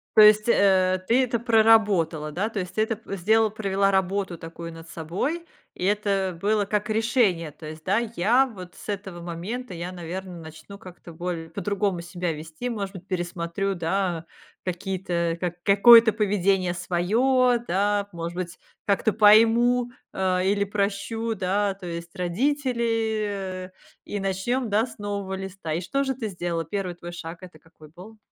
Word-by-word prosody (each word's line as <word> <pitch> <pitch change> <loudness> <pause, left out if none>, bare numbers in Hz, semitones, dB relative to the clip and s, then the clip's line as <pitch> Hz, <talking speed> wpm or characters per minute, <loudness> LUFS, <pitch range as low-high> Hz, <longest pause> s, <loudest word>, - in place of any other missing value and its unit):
То 215 - +9
есть, 215 +2 +7
э, 185 -3 +4
ты 255 +3 +4
это 235 -2 -1
проработала, 210 -9 +3
да? 200 +8 -1
То 215 - -4
есть, 180 0 -6
ты 215 - +2
это 220 -1 0
п 200 -3 -7
сделала, 220 +4 +3
провела 195 -2 0
работу 190 -1 0
такую 165 +1 -8
над 165 0 -12
собой, 195 - -3 0.3
и 180 - -4
это 195 -3 0
было 210 0 +2
как 210 +1 -1
решение. 215 - +1
То 155 - -13
есть, 155 +1 -9
да: 195 +4 +2 0.2
"Я 240 +9 +4
вот 185 -7 -10
с - - -12
этого 190 -4 -5
момента, 180 +8 -5
я 175 +2 -5
наверное, 175 0 -7
начну 160 +5 -11
как-то 180 -4 -12
боль 170 -1 -4
по-другому 200 0 -1
себя 175 -1 -3
вести, 160 +10 -6
может 200 -4 -4
быть, 185 +1 -10
пересмотрю, 175 +1 -2
да, 175 -1 -1 0.4
какие-то 180 -2 -2
ка 175 -1 -2
какое-то 225 +3 +8
поведение 195 -3 +1
своё", 235 +9 +2
да? 200 +2 0
"Может 170 0 -5
быть, 180 -1 -5 0.3
как-то 205 +1 +2
пойму, 230 +3 +5 0.2
а, 185 -1 +1
или 200 +1 +2
прощу, 210 +3 -2
да, 195 +2 0
то 190 - -11
есть 170 0 -6
родители, 220 -4 -1 0.3
и 205 - -4
начнём, 195 +6 -1
да, 215 +3 +2
с 235 - -13
нового 200 -2 -4
листа". 190 -4 -6
И 165 - 0
что 275 +10 -1
же 265 -2 -2
ты 230 -4 -4
сделала? 175 -3 -3
1 185 0 -3
твой 175 0 -9
шаг- 170 0 -7
это 180 - -12
какой 160 -2 -18
был? 190 +8 -13
195 Hz, 165 wpm, -25 LUFS, 175-215 Hz, 0.4 s, То